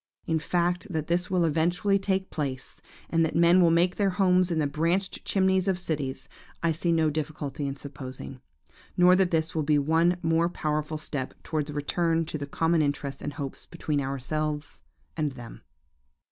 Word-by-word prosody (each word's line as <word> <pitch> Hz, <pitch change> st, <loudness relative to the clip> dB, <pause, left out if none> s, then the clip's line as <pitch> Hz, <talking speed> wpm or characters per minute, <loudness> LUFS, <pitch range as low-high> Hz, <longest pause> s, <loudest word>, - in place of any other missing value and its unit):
In 160 Hz, -1 st, +1 dB
fact, 175 Hz, +4 st, 0 dB
that 160 Hz, -4 st, -2 dB
this 175 Hz, +2 st, 0 dB
will 180 Hz, -2 st, +2 dB
eventually 175 Hz, +6 st, +2 dB
take 190 Hz, -1 st, -1 dB
place, 135 Hz, -4 st, -4 dB, 0.3 s
and 165 Hz, 0 st, +3 dB
that 160 Hz, -, -1 dB
men 170 Hz, +2 st, +6 dB
will 170 Hz, -, +6 dB
make 170 Hz, +2 st, +2 dB
their 200 Hz, -2 st, +2 dB
homes 185 Hz, -1 st, +3 dB
in 170 Hz, -, -1 dB
the 155 Hz, -, +2 dB
branched 170 Hz, +7 st, -1 dB
chimneys 190 Hz, -1 st, +2 dB
of 190 Hz, -2 st, +2 dB
cities, 150 Hz, -7 st, -4 dB, 0.4 s
I 170 Hz, -, +3 dB
see 170 Hz, +2 st, 0 dB
no 160 Hz, -2 st, +3 dB
difficulty 145 Hz, -2 st, -3 dB
in 135 Hz, -, -3 dB
supposing; 135 Hz, -2 st, -9 dB, 0.6 s
nor 180 Hz, +1 st, +7 dB
that 190 Hz, -1 st, +3 dB
this 160 Hz, -1 st, 0 dB
will 160 Hz, -, 0 dB
be 150 Hz, 0 st, +2 dB
one 165 Hz, +5 st, +3 dB
most 165 Hz, +2 st, +2 dB
powerful 155 Hz, 0 st, -2 dB
step 145 Hz, -4 st, -4 dB
towards 155 Hz, -2 st, -2 dB
a -, -, -5 dB
return 165 Hz, +3 st, 0 dB
to 155 Hz, -1 st, -4 dB
the 140 Hz, -, -5 dB
common 165 Hz, +3 st, +1 dB
interests 140 Hz, -1 st, -2 dB
and 145 Hz, -, -4 dB
hopes 140 Hz, -3 st, -7 dB
between 155 Hz, -4 st, -2 dB
ourselves 145 Hz, -, -3 dB, 0.3 s
and 150 Hz, -3 st, -1 dB
them. 120 Hz, -3 st, -10 dB
160 Hz, 180 wpm, -27 LUFS, 145-175 Hz, 0.6 s, nor